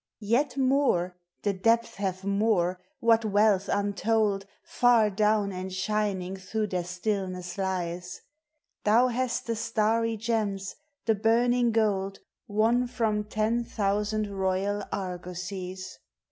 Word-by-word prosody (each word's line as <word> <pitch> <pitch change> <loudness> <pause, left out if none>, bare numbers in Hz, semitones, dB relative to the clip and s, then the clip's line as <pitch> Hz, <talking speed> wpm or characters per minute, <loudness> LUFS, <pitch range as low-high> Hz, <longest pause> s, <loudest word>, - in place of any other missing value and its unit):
Yet 250 +5 +1
more, 260 -10 +2 0.3
the 205 - +1
depths 230 +4 +1
have 190 -1 -2
more! 200 -3 +1 0.2
whal 230 -1 +5
wealth 205 -1 +3
untold, 205 0 +1 0.2
Far 235 -4 +3
down, 210 0 +2
and 185 0 -5
shining 190 -1 -1
through 210 +3 -3
their 180 -1 -1
stillneM 185 -1 -3
lies! 180 -2 -3 0.6
Thou 235 +4 +4
nasi 250 0 -1
the 230 - -1
starry 225 0 +1
gems, 210 -3 -2 0.3
the 225 - +4
burning 235 +3 +3
gold, 195 -3 +1 0.3
Won 230 +4 +2
from 220 -4 0
ten 220 +3 0
thousand 210 0 -1
royal 195 +1 0
argosies! 180 0 -5
210 Hz, 115 wpm, -28 LUFS, 190-225 Hz, 0.6 s, whal